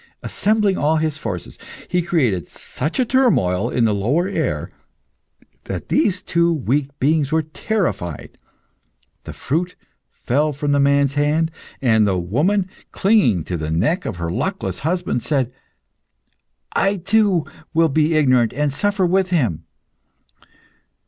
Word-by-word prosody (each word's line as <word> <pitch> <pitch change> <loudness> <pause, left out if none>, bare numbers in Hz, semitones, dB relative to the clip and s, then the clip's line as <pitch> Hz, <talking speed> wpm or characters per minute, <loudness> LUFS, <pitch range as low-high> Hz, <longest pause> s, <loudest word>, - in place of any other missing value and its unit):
Assembling 210 -2 +1
all 155 +2 +2
his 155 -1 -1
forces, 95 - -6 0.3
he 180 - +1
created 135 - 0
such 150 +6 -4
a 255 - +3
turmoil 145 - +2
in 120 -2 +1
the 110 - +2
lower 130 - +1
air 200 - -2 0.9
that - - -6
these 190 - +1
two 170 -1 +2
weak 140 -2 0
beings 150 +1 +1
were 160 0 +2
terrified. 155 - -3 0.9
The - - -7
fruit 175 +6 -2 0.3
fell 150 +4 -1
from 145 +1 -2
the 145 - +3
man's 140 0 +3
hand, 150 +3 +1 0.3
and 110 -4 +4
the 95 -2 +1
woman, 155 - +1 0.2
clinging 190 - +3
to 90 +2 -4
the 75 -1 -4
neck 115 - 0
of 105 - -3
her 85 -1 -3
luckless 190 - -3
husband, 170 -5 -1
said, 130 -4 -1 1.2
"I 195 +1 +2
too 195 -2 +2 0.3
will 165 0 +3
be 155 +3 +2
ignorant 130 -6 +3
and 145 0 -1
suffer 205 +4 +1
with 185 +1 +1
him." 125 - 0
150 Hz, 135 wpm, -20 LUFS, 120-180 Hz, 1.2 s, and